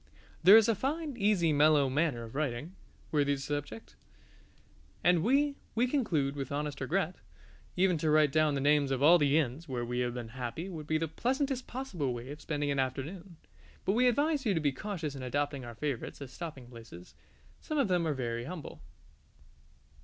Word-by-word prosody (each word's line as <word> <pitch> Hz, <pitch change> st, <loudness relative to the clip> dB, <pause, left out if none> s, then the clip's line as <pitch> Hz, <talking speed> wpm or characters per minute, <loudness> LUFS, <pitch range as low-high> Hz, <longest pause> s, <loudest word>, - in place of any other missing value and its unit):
There 190 Hz, +6 st, +9 dB
is 225 Hz, -, +5 dB
a 230 Hz, -, +4 dB
fine, 285 Hz, -, -3 dB
easy, 200 Hz, -7 st, +2 dB
mellow 145 Hz, -1 st, +5 dB
manner 135 Hz, -3 st, 0 dB
of 115 Hz, -, -10 dB
writing, 145 Hz, +3 st, -3 dB, 0.4 s
worthy 145 Hz, -2 st, +2 dB
the -, -, -8 dB
subject. 135 Hz, -, -5 dB, 1.1 s
And 175 Hz, -2 st, +4 dB
we 280 Hz, -, +2 dB, 0.2 s
we 235 Hz, +2 st, +3 dB
conclude 170 Hz, -, 0 dB
with 135 Hz, -2 st, -5 dB
honest 145 Hz, 0 st, -3 dB
regret. 175 Hz, +5 st, -1 dB, 0.6 s
Even 180 Hz, -3 st, +3 dB
to 155 Hz, -, 0 dB
write 150 Hz, -2 st, +4 dB
down 155 Hz, -1 st, +2 dB
the 135 Hz, -, -1 dB
names 145 Hz, 0 st, +3 dB
of 135 Hz, 0 st, -1 dB
all 170 Hz, +4 st, +7 dB
the 145 Hz, 0 st, +3 dB
inns 150 Hz, +2 st, -2 dB
where 120 Hz, -2 st, -2 dB
we 125 Hz, +1 st, -2 dB
have 125 Hz, -1 st, -1 dB
been 120 Hz, -2 st, -6 dB
happy 125 Hz, +8 st, -5 dB
would 155 Hz, -5 st, -7 dB
be 155 Hz, -, +1 dB
the 165 Hz, +1 st, -1 dB
pleasantest 260 Hz, -, -1 dB
possible 180 Hz, -, -3 dB
way 120 Hz, +3 st, -7 dB
of 150 Hz, -, -9 dB
spending 145 Hz, -2 st, -2 dB
an 140 Hz, -, 0 dB
afternoon. 155 Hz, +7 st, -4 dB, 0.5 s
But 190 Hz, -, +2 dB
we 250 Hz, +3 st, +4 dB
advise 290 Hz, +4 st, +2 dB
you 210 Hz, -6 st, +1 dB
to -, -, +2 dB
be 145 Hz, -2 st, +1 dB
cautious 160 Hz, -1 st, -4 dB
in 135 Hz, -, -7 dB
adopting 140 Hz, +1 st, -2 dB
our 120 Hz, -1 st, -8 dB
favourites 140 Hz, -1 st, -4 dB
as 140 Hz, -3 st, -8 dB
stopping 150 Hz, -7 st, -7 dB
places. 115 Hz, -7 st, -12 dB, 0.5 s
Some 310 Hz, -, -4 dB
of 275 Hz, -6 st, +3 dB
them 175 Hz, -3 st, +1 dB
are 150 Hz, -, 0 dB
very 120 Hz, -2 st, -3 dB
humble. 165 Hz, +1 st, -8 dB
150 Hz, 190 wpm, -31 LUFS, 135-185 Hz, 1.1 s, There